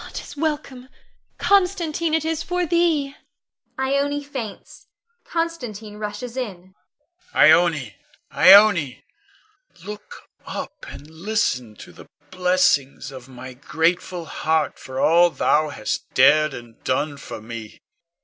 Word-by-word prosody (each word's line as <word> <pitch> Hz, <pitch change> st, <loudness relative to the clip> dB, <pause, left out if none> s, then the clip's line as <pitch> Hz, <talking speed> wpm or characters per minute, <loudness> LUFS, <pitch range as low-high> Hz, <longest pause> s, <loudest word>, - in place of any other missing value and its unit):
'T -, -, -5 dB
is -, -, -11 dB
welcome, 285 Hz, -4 st, -3 dB, 0.5 s
Constantine, 345 Hz, -5 st, +1 dB
it 320 Hz, -1 st, -1 dB
is 325 Hz, -1 st, -1 dB
for 360 Hz, +1 st, -1 dB
thee! 320 Hz, -5 st, +1 dB, 0.6 s
[Ione 280 Hz, +2 st, 0 dB
faints; 255 Hz, -8 st, -8 dB, 0.4 s
Constantine 245 Hz, -12 st, -4 dB
rushes 210 Hz, +3 st, -6 dB
in. 190 Hz, -8 st, -6 dB, 0.6 s
Con. -, -, +4 dB
Ione, 155 Hz, -, +4 dB, 0.4 s
Ione, 185 Hz, -9 st, +6 dB, 0.8 s
look 210 Hz, -, -9 dB, 0.2 s
up -, -, -7 dB
and 145 Hz, -, -11 dB
listen 160 Hz, -, -2 dB
to -, -, -12 dB
the -, -, -15 dB, 0.2 s
blessings 180 Hz, -7 st, +1 dB
of 130 Hz, -1 st, -11 dB
my 130 Hz, 0 st, -10 dB
grateful 170 Hz, +6 st, -1 dB
heart 160 Hz, -1 st, -1 dB
for 130 Hz, 0 st, -7 dB
all 170 Hz, +4 st, +5 dB
thou 155 Hz, -2 st, +1 dB
hast 110 Hz, -7 st, -4 dB
dared 150 Hz, +2 st, +5 dB
and 120 Hz, -1 st, -12 dB
done 145 Hz, +3 st, -1 dB
for 140 Hz, -, -9 dB
me. 110 Hz, -1 st, -9 dB
185 Hz, 120 wpm, -22 LUFS, -, 0.8 s, Ione